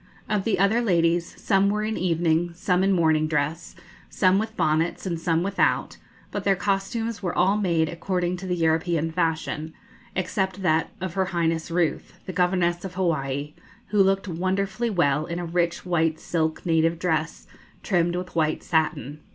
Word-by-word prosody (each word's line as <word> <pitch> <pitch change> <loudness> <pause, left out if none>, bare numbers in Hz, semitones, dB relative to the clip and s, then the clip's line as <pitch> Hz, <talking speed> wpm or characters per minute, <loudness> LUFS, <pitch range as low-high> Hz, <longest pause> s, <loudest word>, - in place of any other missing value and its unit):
Of 210 -3 -1
the 225 - +1
other 200 +5 +3
ladies, 170 -5 +1
some 195 -1 +2
were 210 +1 0
in 215 0 -2
evening, 170 -1 +1
some 180 +1 +1
in 195 - +3
morning 160 -4 +3
dress, 155 +2 -2 0.3
some 185 0 +3
with 220 +1 -4
bonnets 160 +2 0
and 170 -3 -3
some 165 0 +1
without; 200 +1 0 0.3
but - - -3
their 195 -1 +3
costumes 205 +4 -2
were 180 -3 -3
all 195 +3 +4
made 170 -6 +1
according 175 +2 -2
to 185 +1 -7
the 180 - 0
European 165 0 +1
fashion, 160 -2 -2 0.4
except 190 +1 -2
that 160 -2 +2
of 185 -2 -4
her 190 0 +1
Highness 165 -3 -1
Ruth, 165 -3 -1
the 185 - -5
Governess 180 -1 +1
of 185 -2 -7
Hawaii, 150 -5 -1 0.4
who 210 -1 +3
looked 195 +1 +2
wonderfully 190 +6 -1
well 155 -6 +1
in 170 - -4
a 175 - -3
rich 170 +1 -1
white 165 -3 +1
silk 160 -2 -2
native 165 0 +2
dress, 160 -2 -1 0.4
trimmed 175 -3 +1
with 180 -1 -5
white 155 -1 0
satin. 150 -3 -1
175 Hz, 170 wpm, -25 LUFS, 160-190 Hz, 0.4 s, all